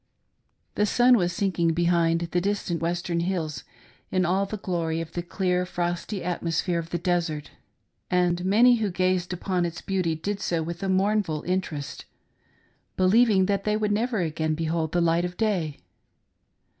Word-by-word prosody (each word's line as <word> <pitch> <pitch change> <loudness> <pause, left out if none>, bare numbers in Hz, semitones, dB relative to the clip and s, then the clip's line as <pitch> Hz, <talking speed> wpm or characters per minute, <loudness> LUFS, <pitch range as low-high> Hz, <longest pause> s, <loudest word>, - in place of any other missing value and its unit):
" - - -47
The 210 - +4
sun 245 +4 +5
was 180 -5 +1
sinking 175 -3 0
behind 170 0 +2
the 175 - +1
distant 190 -4 -1
western 170 0 -1
hills, 170 -4 -2 0.5
in 185 -1 +1
all 190 +3 +1
the 215 - -4
glory 170 -4 -2
of 165 -1 -5
the 175 - -3
clear 180 0 0
frosty 175 +2 -3
atmosphere 170 0 -1
of 165 0 -6
the 175 - -1
desert, 170 -4 -1 0.6
and 175 -1 +1
many 235 +6 +5
who 215 -2 0
gazed 185 0 0
upon 180 0 -1
its 170 -1 -3
beauty 185 -4 -1
did 200 +6 -3
so 170 -4 -1
with 170 +1 -6
a 195 - -1
mournful 190 -4 +1
inter 185 -3 -1
est, 145 0 -7 0.9
believing 195 +1 +4
that 200 0 0
they 210 0 +1
would 210 -1 0
never 220 0 0
again 155 -1 -1
behold 160 0 -1
the 175 - +1
light 170 0 +2
of 180 0 -4
day. 185 -9 -1
180 Hz, 170 wpm, -26 LUFS, 170-195 Hz, 0.9 s, sun